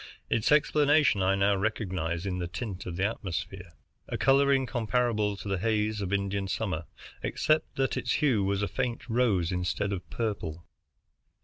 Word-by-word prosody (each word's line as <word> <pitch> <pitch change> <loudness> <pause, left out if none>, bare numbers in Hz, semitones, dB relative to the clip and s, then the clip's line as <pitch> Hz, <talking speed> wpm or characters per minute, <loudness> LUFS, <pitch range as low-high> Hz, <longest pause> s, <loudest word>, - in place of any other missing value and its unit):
Its 115 +3 +2
explanation 150 -5 +4
I 95 +1 +3
now 100 +1 +3
recognized 95 -5 -2
in 90 -2 -2
the 90 - -2
tint 100 +1 -6
of 85 - -4
the 95 +2 0
atmosphere, 95 -4 -4 0.4
a - - -2
coloring 135 0 +4
comparable 115 -3 0
to 100 - -8
the 95 -2 -1
haze 105 0 0
of 95 -1 -3
Indian 100 0 -1
summer, 90 -4 -2 0.4
except 155 0 0
that 135 0 0
its - - 0
hue 125 -9 +2
was 100 +1 0
a - - +1
faint 120 +3 -3
rose 110 -8 +2
instead 90 +3 -1
of 90 -2 -6
purple. 90 -8 -3
100 Hz, 165 wpm, -29 LUFS, 95-120 Hz, 0.4 s, explanation